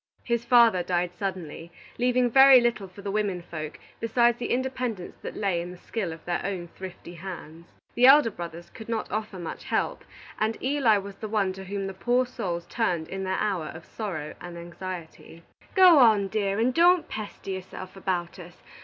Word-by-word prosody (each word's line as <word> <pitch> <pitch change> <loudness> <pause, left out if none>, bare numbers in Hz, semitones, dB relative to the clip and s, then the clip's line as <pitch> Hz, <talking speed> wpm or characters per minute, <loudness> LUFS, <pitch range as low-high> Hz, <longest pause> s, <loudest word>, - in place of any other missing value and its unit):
His 235 -1 0
father 235 -6 +5
died 175 0 -1
suddenly, 175 -4 -5 0.3
leaving 250 0 +3
very 270 +1 +9
little 235 -5 0
for 190 +2 -13
the 200 - -3
women 200 -4 -1
folk 155 -2 -7 0.2
besides 235 +1 +2
the 240 - -3
independence 250 -6 -2
that - - -6
lay 190 -5 0
in 175 - -6
the 180 - -10
skill 190 -1 -4
of 160 0 -10
their 175 -1 -2
own 180 -3 -4
thrifty 185 -1 -10
hands. 170 -2 -9 0.3
The 245 +1 +5
elder 275 -4 +7
brothers 170 -2 -8
could 220 0 -11
not 225 -1 -2
offer 215 -2 -3
much 170 -2 -7
help, - - -1 0.4
and 220 +1 0
Eli 260 -5 +3
was 200 0 -7
the 215 - -6
one 200 -3 +1
to 190 0 -9
whom 195 +1 -3
the 195 - -4
poor 245 +6 +1
souls 175 -8 -4
turned 175 -7 -1
in 190 0 -4
their 190 0 -1
hour 190 -6 -1
of 160 - -9
sorrow 175 -9 -5
and 175 -1 -8
anxiety. 170 -1 -8 0.3
"Go 365 -5 +8
on, 215 -5 +5
dear, 200 -1 0
and 240 +3 +2
don't 350 +2 +5
pester 210 -2 -6
yourself 185 0 -7
about 185 -2 -3
us. 175 0 -13
195 Hz, 190 wpm, -26 LUFS, 175-235 Hz, 0.4 s, very